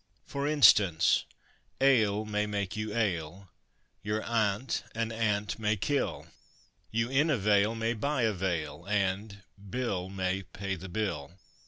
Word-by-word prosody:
For 140 Hz, +1 st, -3 dB
instance, 100 Hz, -, +5 dB, 0.5 s
ale 110 Hz, -6 st, +3 dB
may 105 Hz, 0 st, -1 dB
make 100 Hz, -1 st, -3 dB
you 110 Hz, 0 st, -3 dB
ail, 95 Hz, -4 st, -2 dB, 0.5 s
your 105 Hz, +1 st, -2 dB
aunt 110 Hz, +1 st, 0 dB
an 115 Hz, 0 st, -1 dB
ant 105 Hz, -2 st, -1 dB
may 105 Hz, -1 st, +1 dB
kill, 140 Hz, +8 st, -1 dB, 0.6 s
You 115 Hz, +2 st, -1 dB
in 145 Hz, +4 st, +3 dB
a 145 Hz, -, +3 dB
vale 105 Hz, +1 st, +3 dB
may 115 Hz, +1 st, 0 dB
buy 130 Hz, +3 st, -1 dB
a 110 Hz, -1 st, +2 dB
veil 85 Hz, -5 st, -3 dB
and 100 Hz, 0 st, -1 dB, 0.3 s
Bill 100 Hz, -6 st, -2 dB
may 95 Hz, 0 st, -1 dB
pay 95 Hz, +1 st, -5 dB
the 95 Hz, +2 st, -9 dB
bill. 90 Hz, -6 st, -3 dB
105 Hz, 140 wpm, -30 LUFS, 95-115 Hz, 0.6 s, instance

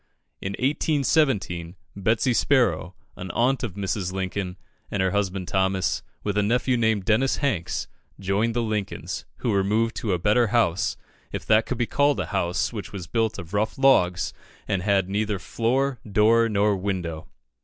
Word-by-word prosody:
In 95 Hz, -, -3 dB
1817, 135 Hz, -, +1 dB, 0.2 s
Betsy 110 Hz, +5 st, +1 dB
Sparrow, 110 Hz, -, +2 dB, 0.2 s
an 90 Hz, -, -7 dB
aunt 125 Hz, +4 st, +2 dB
of 115 Hz, -8 st, -4 dB
Mrs. 95 Hz, -2 st, -2 dB
Lincoln, 95 Hz, 0 st, -3 dB, 0.3 s
and 105 Hz, -, -3 dB
her 95 Hz, 0 st, +2 dB
husband, 95 Hz, -2 st, -1 dB
Thomas, 95 Hz, -1 st, 0 dB, 0.2 s
with 105 Hz, 0 st, 0 dB
a -, -, +4 dB
nephew 125 Hz, +4 st, +1 dB
named 110 Hz, -4 st, +1 dB
Dennis 120 Hz, +6 st, +2 dB
Hanks, 105 Hz, -, -1 dB, 0.3 s
joined 100 Hz, +4 st, 0 dB
the 120 Hz, -, +1 dB
Lincolns, 105 Hz, -3 st, -3 dB, 0.2 s
who 115 Hz, -, +2 dB
removed 105 Hz, +4 st, +1 dB
to 105 Hz, -5 st, -1 dB
a -, -, +2 dB
better 105 Hz, +6 st, +3 dB
house, 100 Hz, -5 st, +1 dB, 0.3 s
if -, -, -5 dB
that 110 Hz, 0 st, +4 dB
could 130 Hz, -, -2 dB
be 120 Hz, -, +1 dB
called 145 Hz, +4 st, +2 dB
a -, -, -1 dB
house 90 Hz, +2 st, -1 dB
which 105 Hz, -3 st, -6 dB
was 95 Hz, -4 st, -6 dB
built 110 Hz, +5 st, 0 dB
of 85 Hz, +3 st, -9 dB
rough 105 Hz, +2 st, 0 dB
logs, 90 Hz, -11 st, +3 dB, 0.3 s
and 100 Hz, -3 st, 0 dB
had 100 Hz, -1 st, +2 dB
neither 105 Hz, +1 st, -1 dB
floor, 120 Hz, +7 st, 0 dB
door, 115 Hz, +3 st, +4 dB
nor 105 Hz, 0 st, +2 dB
window. 90 Hz, -5 st, -3 dB
105 Hz, 165 wpm, -25 LUFS, 95-115 Hz, 0.3 s, a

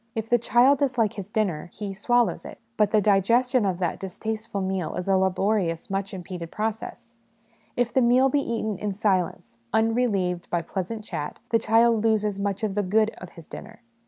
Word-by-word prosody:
If 225 Hz, 0 st, -3 dB
the 240 Hz, -, +4 dB
child 250 Hz, +4 st, +4 dB
dislike 245 Hz, -6 st, +1 dB
his 200 Hz, -3 st, -7 dB
dinner, 190 Hz, -8 st, -1 dB
he 205 Hz, -2 st, -6 dB
swallows 240 Hz, +4 st, +1 dB
it, -, -, -10 dB, 0.2 s
but 210 Hz, -3 st, +3 dB
the 215 Hz, 0 st, +3 dB
digestion 230 Hz, +4 st, +3 dB
of 185 Hz, -2 st, -1 dB
that 175 Hz, -2 st, -2 dB
distasteful 215 Hz, +2 st, -4 dB
meal 190 Hz, -4 st, -2 dB
is 180 Hz, -, -4 dB
a 195 Hz, -, +3 dB
laborious, 190 Hz, -2 st, 0 dB
much 195 Hz, +1 st, -2 dB
impeded 180 Hz, -3 st, -7 dB
process: 225 Hz, +3 st, -5 dB, 0.6 s
if 245 Hz, -1 st, 0 dB
the 260 Hz, -, +3 dB
meal 250 Hz, +2 st, +5 dB
be 285 Hz, +1 st, +1 dB
eaten 220 Hz, -5 st, -3 dB
in 210 Hz, -1 st, -2 dB
silence, 185 Hz, -, -1 dB
unrelieved 220 Hz, -6 st, +1 dB
by 170 Hz, -1 st, -1 dB
pleasant 200 Hz, +5 st, -4 dB
chat, 155 Hz, -8 st, -5 dB
the 230 Hz, -, +3 dB
child 225 Hz, 0 st, +3 dB
loses 210 Hz, -3 st, +1 dB
much 200 Hz, +1 st, -2 dB
of 210 Hz, -2 st, 0 dB
the 205 Hz, -, +1 dB
'good' 215 Hz, +3 st, +2 dB
of 180 Hz, -, -10 dB
his 165 Hz, -2 st, -13 dB
dinner. 225 Hz, +2 st, -11 dB
210 Hz, 185 wpm, -25 LUFS, 190-230 Hz, 0.6 s, meal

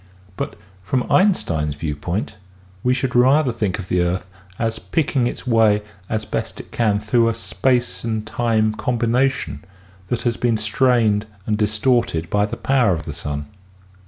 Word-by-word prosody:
But -, -, -4 dB, 0.3 s
from 125 Hz, +7 st, 0 dB
Einstein's 80 Hz, -, +2 dB
viewpoint 80 Hz, +8 st, -3 dB, 0.4 s
we 125 Hz, -, +2 dB
should 125 Hz, -1 st, -1 dB
rather 130 Hz, +3 st, +5 dB
think 105 Hz, -5 st, -1 dB
of 95 Hz, -3 st, -7 dB
the 90 Hz, -1 st, +1 dB
earth 90 Hz, +1 st, -1 dB, 0.3 s
as 115 Hz, -1 st, -1 dB
picking 135 Hz, -5 st, 0 dB
its -, -, -5 dB
way 110 Hz, -4 st, +3 dB, 0.3 s
as 110 Hz, -1 st, -1 dB
best -, -, -4 dB
it -, -, -10 dB
can 105 Hz, -3 st, +1 dB
through 115 Hz, +2 st, +2 dB
a 115 Hz, -, -2 dB
space 120 Hz, -4 st, 0 dB
and 110 Hz, -2 st, -2 dB
time 110 Hz, -1 st, +1 dB
combination 120 Hz, +2 st, 0 dB, 0.4 s
that 120 Hz, -, -2 dB
has 120 Hz, -1 st, 0 dB
been 120 Hz, -2 st, +1 dB
strained 110 Hz, -1 st, +2 dB, 0.2 s
and 110 Hz, -, +1 dB
distorted 105 Hz, -5 st, +1 dB
by 105 Hz, 0 st, +2 dB
the 115 Hz, +1 st, -5 dB
power 115 Hz, -4 st, +2 dB
of 80 Hz, -, -5 dB
the 75 Hz, -, -5 dB
sun. 75 Hz, -2 st, -4 dB
110 Hz, 160 wpm, -21 LUFS, 100-120 Hz, 0.4 s, rather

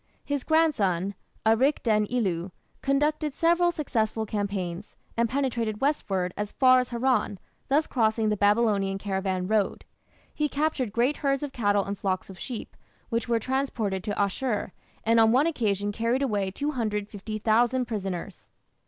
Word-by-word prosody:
His 285 Hz, -2 st, -2 dB
grandson, 200 Hz, -, +2 dB, 0.3 s
Arik 250 Hz, +7 st, +3 dB
den 215 Hz, -2 st, +2 dB
ilu, 190 Hz, -7 st, -1 dB, 0.3 s
conducted 295 Hz, +1 st, +1 dB
several 345 Hz, +1 st, +3 dB
successful 225 Hz, -9 st, -1 dB
campaigns, 200 Hz, -3 st, -4 dB, 0.2 s
and 230 Hz, 0 st, +1 dB
penetrated 235 Hz, -5 st, -1 dB
westward 195 Hz, -11 st, 0 dB
as 210 Hz, 0 st, -4 dB
far 255 Hz, -1 st, +6 dB
as 250 Hz, -, -2 dB
Haran, 245 Hz, -4 st, +1 dB, 0.3 s
thus 295 Hz, +3 st, +3 dB
crossing 220 Hz, -2 st, +1 dB
the 210 Hz, -, +1 dB
Babylonian 205 Hz, -1 st, +2 dB
caravan 190 Hz, -2 st, -2 dB
road. 215 Hz, -1 st, 0 dB, 0.5 s
He 300 Hz, -1 st, 0 dB
captured 285 Hz, -6 st, -1 dB
great 245 Hz, +6 st, +1 dB
herds 275 Hz, -1 st, 0 dB
of 285 Hz, -2 st, -5 dB
cattle 205 Hz, -3 st, +2 dB
and 200 Hz, -, -3 dB
flocks 190 Hz, 0 st, -2 dB
of 185 Hz, -, -13 dB
sheep, 245 Hz, -4 st, -6 dB, 0.3 s
which 230 Hz, 0 st, -1 dB
were 235 Hz, -, +3 dB
transported 225 Hz, -7 st, -1 dB
to 205 Hz, -, -2 dB
Asshur, 205 Hz, +1 st, -1 dB, 0.3 s
and 230 Hz, +1 st, +4 dB
on 225 Hz, 0 st, +6 dB
one 260 Hz, +5 st, +4 dB
occasion 205 Hz, -, 0 dB
carried 230 Hz, +5 st, 0 dB
away 205 Hz, -7 st, 0 dB
250,000 220 Hz, 0 st, 0 dB
prisoners. 195 Hz, -6 st, -5 dB
225 Hz, 145 wpm, -27 LUFS, 205-265 Hz, 0.5 s, far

